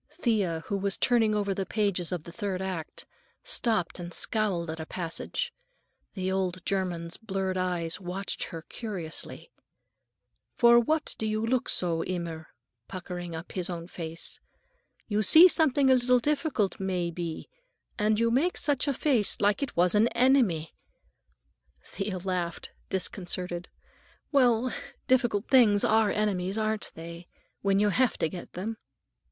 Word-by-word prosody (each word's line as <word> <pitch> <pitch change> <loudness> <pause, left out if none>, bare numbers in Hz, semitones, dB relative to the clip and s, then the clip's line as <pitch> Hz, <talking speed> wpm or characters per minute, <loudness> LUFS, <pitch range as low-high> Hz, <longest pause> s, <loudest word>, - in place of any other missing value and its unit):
Thea, 195 - +1
who 200 - -1
was 195 0 -1
turning 225 -4 +3
over 200 -1 0
the 195 - -2
pages 190 -3 0
of 175 -4 -3
the 170 - -10
third 195 -1 -3
act, 185 -4 -5 0.4
stopped 220 -7 0
and 175 0 -6
scowled 190 -7 0
at 160 - -7
a 160 - -4
passage. 190 - -4 0.6
The 190 -1 -1
old 185 -2 -2
German's 175 -3 -2
blurred 195 -4 -2
eyes 180 -2 -1
watched 185 +2 -3
her 165 -3 -8
curiously. 200 - -6 1.0
"For 235 0 +7
what 310 +6 +1
do 220 - -1
you 215 +1 -1
look 250 +1 0
so, 165 -2 +1
immer?" 170 -3 -4 0.4
puckering 180 -2 -6
up 160 +2 -8
his 180 -2 -2
own 170 -1 -5
face. 165 -2 -4 0.7
"You 210 -1 +1
see 315 - +9
something 285 -6 +3
a - - +8
little 250 0 +4
difficult, 280 - 0
may 180 -3 -1
be, 170 -1 -5 0.5
and 210 +1 +2
you 230 0 +2
make 300 +9 +1
such 290 -1 +1
a 280 - +1
face 245 -9 +2
like 205 +5 +2
it 280 - -4
was 175 +1 +4
an 215 +2 +5
enemy." 235 - +3 1.1
Thea 195 0 -4
laughed, 180 -2 -3 0.2
disconcerted. 180 -2 -3 0.6
"Well, 250 -3 +3 0.3
difficult 240 -5 +2
things 225 -6 +5
are 220 -1 +4
enemies, 195 -2 0
aren't 215 -1 -1
they? 170 +1 -9 0.3
When 195 0 +2
you 205 +1 +3
have 250 +4 +2
to - - +1
get 180 0 -9
them?" 215 +5 -4
195 Hz, 145 wpm, -28 LUFS, 175-230 Hz, 1.1 s, see